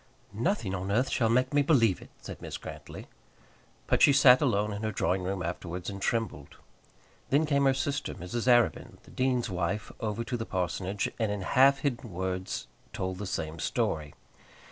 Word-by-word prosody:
"Nothing 110 - -1
on 95 +1 -3
earth 125 +6 +1
shall 115 -3 +2
make 130 +3 +2
me 145 - +4
believe 120 - +3
it," - - -13
said - - -9
Mrs. - - -6
Grantly. - - -9 0.8
But - - +1
she 140 - +7
sat 130 -2 +7
alone 105 -6 +1
in 100 - -5
her 110 0 -1
drawing 95 -2 0
room 95 0 -3
afterwards 90 +2 -4
and 100 0 -8
trembled. 110 -13 -2 0.7
Then 145 +3 +3
came 140 -2 +2
her 135 - +5
sister, 140 +1 -2
Mrs. 110 +8 -4
Arabin, 120 -1 +3
the - - -17
dean's 125 -2 0
wife, 90 +4 -2
over 110 +1 -2
to 120 +1 -3
the 115 - -3
parsonage, 95 +2 -2
and 110 -3 +1
in 105 -1 -3
half 135 +6 +4
hidden 120 -5 -2
words 95 +1 -3 0.3
told 95 0 -3
the 105 - -4
same 80 -2 -4
story. 75 +2 -1
105 Hz, 180 wpm, -29 LUFS, 95-130 Hz, 0.8 s, she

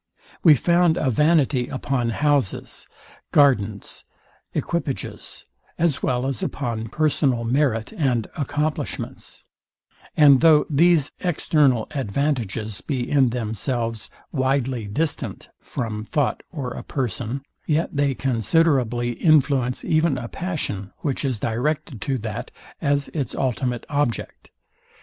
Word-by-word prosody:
We 155 -4 +7
found 170 +3 +3
a 135 - +1
vanity 150 -3 +3
upon 125 -2 -1
houses, 140 -3 0 0.4
gardens, 110 -8 +2 0.5
equipages, 145 - -4 0.3
as 160 -4 +1
well 125 0 0
as 135 -4 -2
upon 115 -5 -3
personal 140 -5 +1
merit 115 -2 0
and 125 -7 0
accomplishments; 150 +1 -3 0.7
and 140 -4 +7
though 155 -2 +6
these 160 -1 +4
external 145 -8 +2
advantages 115 -5 -2
be 130 -5 -2
in 135 -4 +3
themselves 115 0 -2 0.2
widely 130 -4 0
distant 150 +9 -3
from 110 -3 -4
thought 140 +4 0
or 135 -7 -5
a - - -6
person, 125 +1 -3 0.2
yet 155 0 0
they 140 -1 +1
considerably 125 -1 +1
influence 140 -3 +2
even 155 -3 +2
a 120 -2 -5
passion, 120 - -3
which 140 -2 -2
is 130 -6 -1
directed 120 +1 -2
to 135 +4 -1
that 110 -3 -5 0.3
as 140 0 +1
its 145 -5 -3
ultimate 125 -2 -1
object. 145 -5 -2
135 Hz, 115 wpm, -23 LUFS, 120-150 Hz, 0.7 s, We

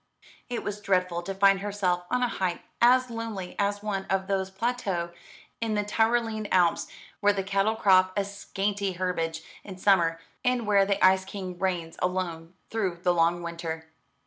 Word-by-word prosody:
It 245 - -3
was 205 0 -4
dreadful 180 -3 +1
to 195 +2 -5
find 195 0 +5
herself 195 -3 -1
on 250 0 +1
a - - +3
height 185 -6 -2 0.2
as 255 +1 +5
lonely 225 -5 -5
as 205 0 0
one 195 -2 -2
of 190 0 0
those 190 -1 -1
plateaux 195 -5 -2 0.5
in 225 -2 0
the 210 - +1
Tyrolean 225 0 +1
Alps 175 -2 +3 0.3
where 205 0 +4
the 195 -1 -2
cattle 195 +3 +1
crop 185 -3 +5
a 200 - +1
scanty 200 0 -2
herbage 165 -3 -2 0.2
in 190 -2 -9
summer, 175 -4 +3 0.2
and 250 -2 +1
where 200 -2 +4
the 200 -1 +3
Ice 190 0 +5
King 185 -2 -7
reigns 175 -4 -2
alone 180 -2 -2 0.2
through 195 -6 -1
the 180 - +3
long 170 0 +2
winter. 165 -1 -5
195 Hz, 170 wpm, -27 LUFS, 180-205 Hz, 0.5 s, find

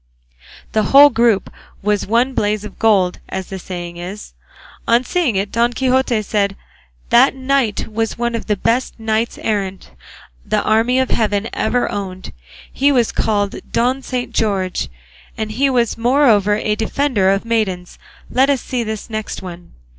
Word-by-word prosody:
The 220 - +2
whole 285 +1 +8
group 230 -5 +1 0.3
was 210 -1 0
one 240 +5 +2
blaze 210 -2 0
of 210 - -11
gold, 195 -5 +2
as 190 0 -4
the 190 - -6
saying 175 -2 -7
is. 185 +4 -8 0.5
On 235 +2 +4
seeing 315 - 0
it 195 +1 -1
Don 235 +1 +1
Quixote 255 -3 +1
said, 200 -1 0 0.6
"That 255 +3 +5
knight 265 -4 0
was 225 0 -2
one 235 0 -1
of 230 - -4
the 210 - +1
best 230 +5 -1
knights 225 +1 -1
errant 195 - -3 0.5
the - - 0
army 225 +4 +2
of 260 -1 +1
heaven 210 -1 0
ever 245 - 0
owned; 190 -2 -6 0.4
he 280 +2 +3
was 245 -5 +2
called 205 -2 0
Don 255 +3 +1
Saint 250 -1 -4
George, 195 -4 -1 0.5
and 220 -1 -3
he 270 +6 +1
was 235 -3 0
moreover 230 -5 +3
a 210 0 -1
defender 220 -2 +1
of 195 +2 +1
maidens. 195 -6 -2 0.3
Let 265 +3 +2
us 275 -3 +1
see 250 -2 -3
this 220 -1 -5
next 220 -3 -5
one." 175 -1 -10
220 Hz, 160 wpm, -18 LUFS, 200-245 Hz, 0.6 s, whole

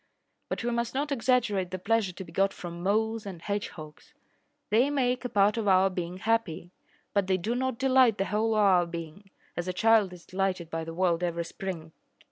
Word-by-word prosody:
But - - -3
we 240 - 0
must 235 +1 -2
not 290 +2 -1
exaggerate 230 -7 +1
the 185 - -4
pleasure 210 +1 +1
to 190 +2 -8
be 165 - -13
got 195 +3 +1
from 170 -1 -8
moles 220 +3 0
and 185 -4 -7
hedgehogs. 200 - -6 0.6
They 240 +6 +4
make 255 -3 0
a 250 - -3
part 205 0 +3
of 220 -2 -1
our 190 0 +4
being 180 0 -4
happy, 190 -5 -1 0.4
but 200 -2 +1
they 190 -1 +2
do 210 +6 -2
not 260 -1 -1
delight 255 -4 +4
the 195 - 0
whole 220 +3 0
of 215 - +3
our 185 -4 +4
being, 170 +3 -8 0.3
as 175 +1 -3
a 185 - -1
child 220 -1 +4
is 180 -1 -12
delighted 185 -3 -2
by 165 0 -3
the 165 0 -7
world 175 -2 +1
every 170 -1 -1
spring. 170 -4 -6
195 Hz, 205 wpm, -28 LUFS, 175-225 Hz, 0.6 s, They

